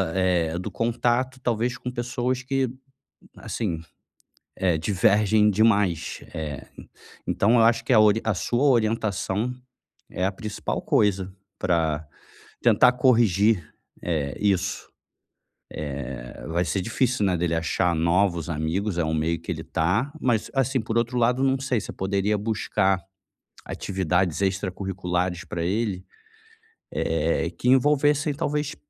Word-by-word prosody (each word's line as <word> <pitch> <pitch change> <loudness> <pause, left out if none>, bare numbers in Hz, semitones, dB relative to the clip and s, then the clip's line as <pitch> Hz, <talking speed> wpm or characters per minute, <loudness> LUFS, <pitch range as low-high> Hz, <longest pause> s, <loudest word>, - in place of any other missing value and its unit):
é 90 -3 +1
do 90 - -5
contato, 120 +2 0
talvez 120 0 -1
com 125 - -5
pessoas 125 +1 -2
que, 135 0 0 0.7
assim, 90 -8 -3 0.8
eh, 90 -4 +1
divergem 105 +4 +3
demais. 100 -5 +2
Eh, 75 -3 -5 0.6
então 110 +4 +2
eu 120 - +5
acho 115 0 +3
que - - -2
a 110 - +7
ori 110 +1 +5
a 110 - +1
sua 120 +7 0
orientação 110 -3 +1 0.6
é 90 - -2
a 95 - +1
principal 105 +1 -4
coisa 95 -2 +1 0.3
para 80 -4 0 0.6
tentar 125 - +5
corrigir, 110 - +3 0.3
eh, 75 -5 -2
isso. 95 -2 0 0.8
Eh, 65 -4 -6
vai 85 +2 +1
ser 95 - -1
difícil, 115 +1 0
né, 95 -2 +2
dele 85 0 0
achar 85 +2 +1
novos 85 +1 +1
amigos, 85 +5 -2
é 85 - +1
um 80 - -1
meio 80 +1 0
que - - -5
ele - - -4
tá, 100 - 0
mas 120 -4 +1
assim, 135 0 +1
por 110 +1 -2
outro 115 +1 0
lado, 125 +2 +2
não 135 0 +2
sei 130 -4 -1
se - - -7
poderia 100 +2 0
buscar 100 -3 0 0.7
atividades 95 -2 -1
extracurriculares 95 -2 -2
para 85 -2 -4
ele, 100 -1 -1 0.9
eh, 80 +1 0
que - - -3
envolvessem 145 +3 +3
talvez 150 0 -2
100 Hz, 130 wpm, -25 LUFS, 90-120 Hz, 0.9 s, a